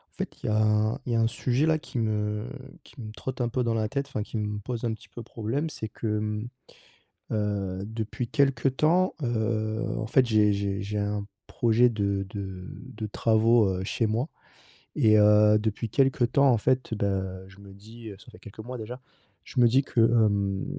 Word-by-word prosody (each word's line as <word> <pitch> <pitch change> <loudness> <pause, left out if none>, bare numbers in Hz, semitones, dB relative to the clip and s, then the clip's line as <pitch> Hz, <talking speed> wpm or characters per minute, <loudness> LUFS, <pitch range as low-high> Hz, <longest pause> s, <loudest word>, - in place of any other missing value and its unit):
En - - -18
fait, - - -6
il - - -2
y - - +1
a 105 - +1
un 110 +4 +2
il 120 - -2
y - - +1
a 115 - +3
un 115 - +3
sujet 125 +5 0
là 160 -1 +2
qui 135 - -8
me 105 -1 -1 0.4
qui - - -17
me 110 -1 -7
trotte 130 +2 -6
un 120 - +1
peu 125 +2 -1
dans 115 -1 0
la 110 -1 0
tête, 140 +3 -3
enfin 110 -5 -3
qui 110 - -6
me 105 -1 -3
pose 120 +3 -5
un 115 -2 0
petit - - -12
peu 120 - -9
problème. 120 +8 -3
C'est 110 -7 -6
que, 110 - -9
mmh, 105 +1 -3 0.8
heu, 100 -3 -1
depuis 110 +2 -4
quelque 135 -2 +2
temps, 165 +7 +2
heu, 110 -1 -1
en 110 - -2
fait, 125 +2 +3
j'ai 105 -2 +4
j'ai 100 0 -2
j'ai 105 +1 -3
un 105 0 -2 0.2
projet 120 +1 +3
de 100 -3 -1
de 95 -3 -7
de 125 -5 -8
travaux, 110 +1 +3
heu, 95 -1 -2
chez 115 +4 -1
moi 115 +7 -1 0.7
et 110 -1 +5
heu, 105 0 +6
depuis 110 +1 -2
quelque 135 +1 +2
temps 140 +4 +3
en 120 -3 +4
fait, 130 +1 0
bah, 95 -2 -2
je 95 +1 -17
me 100 -1 -13
dis, 110 +3 -11
heu, 100 - -9
ça 125 - -15
fait 110 - -15
quelques 105 -2 -14
mois 125 +3 -7
déjà, 120 +3 -7 0.4
je - - -2
me 120 - +7
dis 130 +4 +3
que, 125 - -1
hem, 100 -4 +2
110 Hz, 215 wpm, -27 LUFS, 105-120 Hz, 0.8 s, me